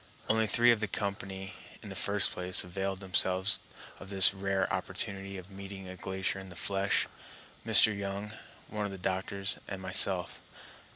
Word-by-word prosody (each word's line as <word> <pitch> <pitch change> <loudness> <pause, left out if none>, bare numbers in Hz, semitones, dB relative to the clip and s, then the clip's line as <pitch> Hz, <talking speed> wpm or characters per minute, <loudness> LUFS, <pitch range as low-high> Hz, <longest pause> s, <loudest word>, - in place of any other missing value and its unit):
Only 110 0 +2
three 120 +3 +5
of 115 - +2
the 105 - -2
company, 95 -1 -5 0.3
in - - -9
the - - -8
first 100 0 +3
place, 90 0 +1
availed 95 +1 -4
themselves 95 +1 +2 0.4
of 95 - -11
this 95 -1 +7
rare 95 -1 -1
opportunity 100 0 -3
of 95 +1 -11
meeting 95 0 -9
a 90 - -8
glacier 95 +1 -3
in 95 0 -10
the 90 - -11
flesh,—Mr. 100 +2 +1
Young, 100 +1 -5 0.3
one 105 -1 -3
of 100 - -4
the 95 - -7
doctors, 95 +2 -2
and 95 - -5
myself. 95 -1 +2
95 Hz, 160 wpm, -30 LUFS, 95-100 Hz, 0.4 s, this